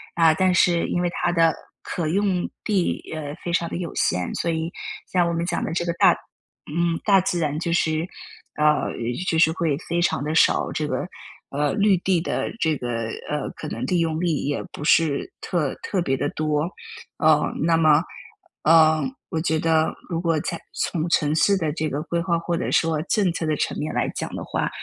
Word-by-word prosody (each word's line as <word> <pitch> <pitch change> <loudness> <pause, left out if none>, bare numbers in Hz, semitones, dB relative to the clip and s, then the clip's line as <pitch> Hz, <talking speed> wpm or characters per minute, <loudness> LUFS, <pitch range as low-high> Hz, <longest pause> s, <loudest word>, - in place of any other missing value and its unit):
啊， 165 -2 +5
但 185 +3 +2
是 175 -1 +3
因 175 - -1
为 175 - +1
它 175 - 0
的 165 -2 +4 0.3
可 170 -3 -3
用 190 +1 0 0.2
地， 195 -5 0
呃， 145 -2 -5
非 175 - -3
常 170 -1 +1
地 - - -4
有 175 -3 -5
限， 90 0 0
所 170 - -1
以 160 +1 -2 0.4
像 175 -2 +3
我 - - -1
们 170 0 -1
讲 175 -1 -1
的 - - -3
这 175 0 -1
个 170 - -1
大 - - +5 0.6
嗯， 170 -1 +1
大 195 -3 +5
自 180 -1 -1
然 150 -2 -1
就 170 +1 -2
是 160 -1 +1 0.5
呃， 150 0 +2 0.4
就 160 - +1
是 160 -1 +5
会 160 -5 0
非 170 +1 0
常 170 - +1
地 150 +2 -2
少 - - +4
这 - - -1
个， - - -2 0.4
呃， 145 +1 0
绿 205 -2 +4
地 185 -2 +1
的 165 - -2
这 160 -5 +2
个 120 -4 -3 0.2
呃， 150 0 -2
可 155 - -6
能 - - -4
利用率 165 -3 0
也 145 - -1
不 - - -7
是 150 -2 +2
特 155 -7 -1
特 190 - -2
别 135 -5 0
地 - - -1
多。 155 +1 0 0.5
呃， - - +4 0.2
那 165 0 +3
么， 155 -1 +5 0.6
呃， 155 -1 +6 0.3
我 160 - -2
觉 160 0 +1
得 160 0 +2
如 165 -2 -1
果 165 -2 +1
在 170 - -4
从 165 -2 -1
城 150 -3 +2
市 200 +5 +4
的 160 -5 -1
这 155 0 -2
个 145 +1 -3
规 170 +1 -1
划 170 -1 +1
或 170 0 -2
者 - - -2
说 160 -2 +2
政 190 0 +1
策 165 - -3
的 155 - +1
层面 150 +1 -2
来 - - +1
讲 - - -5
的 - - -5
话， - - -2
165 Hz, 220 characters per minute, -23 LUFS, 155-175 Hz, 0.6 s, 呃